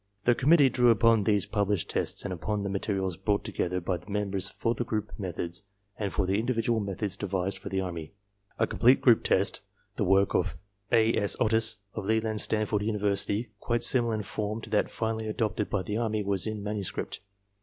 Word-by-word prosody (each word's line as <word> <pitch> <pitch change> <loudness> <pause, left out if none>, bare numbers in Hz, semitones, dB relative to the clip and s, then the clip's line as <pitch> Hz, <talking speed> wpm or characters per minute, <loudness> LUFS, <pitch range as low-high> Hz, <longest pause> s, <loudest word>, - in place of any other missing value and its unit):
The 120 - +5
com 130 +4 0
mittee 145 -6 +6
drew 125 -1 +4
upon 115 -2 +4
these 105 -2 +3
published 100 -3 0
tests - - -2
and 100 - -3
upon 100 +4 -2
the 100 - -2
materials 95 -3 -1
brought 105 -1 0
together 90 +1 -2
by 90 +1 -1
the 90 +4 -16
members 100 -2 -1
for 115 - -1
the 120 - -2
group 105 -2 -3
methods 90 0 -4 0.3
and 100 -3 -3
for 95 - 0
the 95 +3 +1
individual 115 -1 0
methods 100 -1 -3
devised 95 -1 -2
for 100 - -7
the 95 0 -1
Army. 85 -4 -5 0.5
A - - +3
complete 125 +3 +4
group 120 -4 +5
test, - - +1 0.4
the - - +1
work 95 +1 +3
of - - 0 0.3
A. 115 -1 +4
S. 100 -1 +1
Otis 110 -1 +2 0.2
of 110 - -5
Leland 110 -1 +1
Stanford 105 -1 0
University, 105 +1 0
quite 120 +1 -1
similar 120 -3 +3
in 105 - -3
form 105 +2 -3
to - - -10
that 105 - +2
finally 110 -1 -2
adopted 110 -1 -1
by 100 -3 -1
the 105 +2 -3
Army 110 -2 -1
was 100 0 0
in 110 -1 -4
manuscript. 105 -2 -4
105 Hz, 200 wpm, -28 LUFS, 100-110 Hz, 0.5 s, mittee